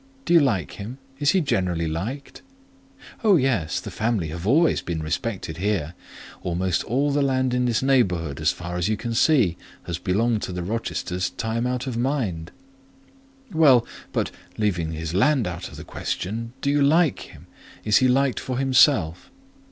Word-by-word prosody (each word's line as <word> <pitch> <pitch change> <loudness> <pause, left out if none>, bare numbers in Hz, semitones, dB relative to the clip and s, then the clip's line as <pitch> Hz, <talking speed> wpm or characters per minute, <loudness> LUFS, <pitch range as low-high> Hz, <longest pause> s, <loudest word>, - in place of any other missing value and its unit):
"Do - - +1
you 170 - +8
like 115 - +1
him? 115 +6 -6 0.2
Is 145 -1 +2
he 190 - +3
generally 90 - 0
liked?" 105 - -5 0.8
"Oh, 210 -4 +6
yes; 125 - +1
the - - -8
family 110 -7 -1
have 85 +4 -5
always 160 +8 +3
been 80 -2 -4
respected 80 0 -3
here. 90 -5 -1 0.5
Almost 90 0 -1
all 140 +5 +1
the 145 +1 +1
land 130 -2 +1
in 125 0 +1
this 120 0 +1
neighbourhood, 90 - +1
as 75 - +3
far 90 0 -6
as 90 +3 0
you 110 - 0
can 120 +1 -4
see, 115 - +3 0.3
has 85 -1 -4
belonged 105 +5 +1
to - - -4
the 90 -1 -4
Rochesters 90 -3 -2
time 115 +5 -2
out 125 0 -2
of 125 -3 -3
mind." 115 - -2 1.0
"Well, 140 -8 +5 0.3
but, - - -1 0.3
leaving 90 -7 -1
his 80 +1 -4
land 130 +5 +3
out 85 -1 -5
of - - -12
the - - -8
question, 115 +5 -4
do 140 - +1
you 145 0 +2
like 155 +1 +3
him? - - -12 0.4
Is 105 -1 +4
he 130 - +4
liked 135 +1 +2
for 130 -1 -4
himself?" 130 - +3
110 Hz, 175 wpm, -24 LUFS, 90-130 Hz, 1.0 s, you